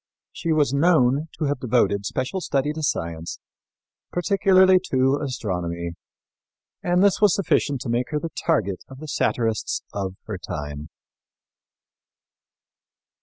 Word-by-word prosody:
She 165 - -3
was 150 -4 +2
known 145 -2 +3
to - - -2
have 145 -1 -1
devoted 110 -5 +1
special 130 +9 -2
study 145 -2 0
to 160 - -5
science, 85 - -2 0.7
particularly 190 0 +4
to 135 +2 +2
astronomy, 90 -10 -3 0.9
and 180 +1 +2
this 200 0 +3
was 205 -4 +5
sufficient 145 - +1
to - - -4
make 120 +2 0
her 150 - -1
the 165 - -4
target 105 - 0
of 135 - -11
the 155 +3 -9
satirists 115 -6 0
of 95 -2 -3
her 105 -4 -6
time. 75 -1 -6
135 Hz, 125 wpm, -23 LUFS, 100-165 Hz, 0.9 s, was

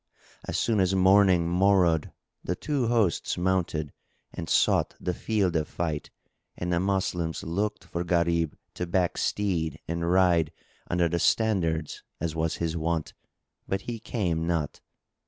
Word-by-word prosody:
As - - -2
soon 110 -3 +1
as 95 0 +2
morning 95 -2 +5
morrowed 90 -3 +3 0.3
the 90 - -1
two 140 - -1
hosts 110 -8 +1
mounted 90 -5 0 0.4
and 80 - -6
sought - - +3
the 90 - -2
field 100 -3 0
of 80 -1 +1
fight; 80 -3 -3 0.5
and 90 0 -2
the 85 - +2
Moslems 90 -3 -1
looked 100 +6 -2
for 85 - -4
Gharib 85 -2 +1 0.2
to 90 - -4
back 90 0 +1
steed 80 -7 -1
and 85 +1 -2
ride 90 -4 +3 0.4
under 90 -1 +2
the 85 +1 -1
standards 85 -8 +1 0.2
as 80 -1 -2
was 80 0 0
his 85 -1 -2
wont, 80 -1 -2 0.5
but 95 0 -1
he 115 +2 -5
came 85 -8 -1
not. 80 -4 -2
85 Hz, 145 wpm, -27 LUFS, 80-95 Hz, 0.5 s, morning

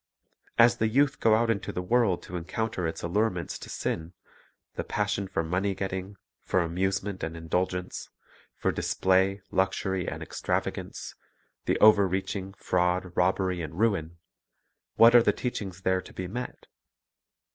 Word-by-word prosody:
As 115 +1 +6
the 110 - +2
youth 140 +5 +2
go 110 -1 +5
out 115 +1 +2
into 100 -3 -2
the 90 - -3
world, 110 -2 +2
to 90 - -8
encounter 90 +1 -2
its 80 - -5
allurements 90 0 -1
to - - -9
sin, 80 +2 -3 0.3
— - - -39
the - - -2
passion 100 -1 -1
for 85 - -1
money 95 +4 0
getting, 95 +1 -4 0.3
for 95 - +1
amusement 95 +3 -1
and 80 +1 -4
indulgence, 90 +2 -2 0.5
for - - 0
display, 95 +1 +1
luxury, 95 -1 0
and - - -4
extravagance, - - -3 0.5
the - - +2
overreaching, 95 -1 +3
fraud, 90 -1 0
robbery, 90 0 +1
and 80 0 -6
ruin, 95 -7 0 0.4
— - - -51
what 115 +1 +7
are 120 - +9
the 105 - +3
teachings 100 -5 -4
there 95 0 +2
to - - -14
be 95 - -4
met? 120 +7 -6
95 Hz, 150 wpm, -28 LUFS, 90-105 Hz, 0.5 s, are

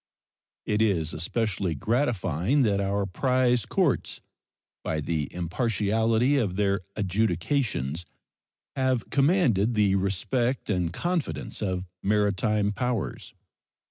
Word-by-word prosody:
It 105 +1 +1
is 85 -8 +1
especially 95 0 -1
gratifying 110 - +1
that 100 -3 +2
our 100 0 0
prize 125 +3 +1
courts, - - 0 0.6
by 80 - -1
the 75 -1 -2
impartiality 110 - +1
of 105 -8 0
their 100 -1 +1 0.2
adjudications, 95 - -1 0.7
have 130 -3 0
commanded 135 - +3
the 105 -2 +3
respect 105 +6 0
and 90 -4 0
confidence 170 - -3
of 95 -3 -2 0.2
maritime 105 0 +1
powers. 120 +1 -3
105 Hz, 100 wpm, -26 LUFS, 95-120 Hz, 0.7 s, commanded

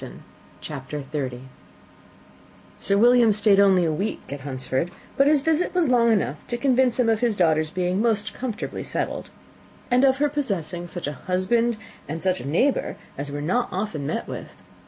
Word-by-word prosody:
Sir 200 - +1
William 240 +1 +6
stayed 205 -1 +4
only 190 -3 +5
a 160 - +1
week 190 -4 -4
at 140 - -6
Hunsford; 130 +3 -2 0.3
but 275 - +4
his 295 -1 +4
visit 320 +5 0
was 345 -6 +2
long 235 -2 +4
enough 195 -8 +1
to 240 - -2
convince 255 -2 +2
him 245 - +3
of 225 -2 +2
his 235 -3 +1
daughter's 155 -4 +2
being 180 +3 -1
most 220 -2 +1
comfortably 245 -4 -4
settled, - - -3 0.6
and 250 +2 +4
of 265 -1 +4
her 295 +2 +2
possessing 195 - -3
such 175 0 -6
a 145 - -3
husband 225 +6 +1 0.3
and 160 +2 -3
such 185 +1 0
a - - -7
neighbour 250 - +1 0.2
as 140 +1 -5
were 145 0 -4
not 240 +10 0
often 180 -7 -3
met - - -3
with. - - -9
210 Hz, 165 wpm, -24 LUFS, 175-245 Hz, 0.6 s, William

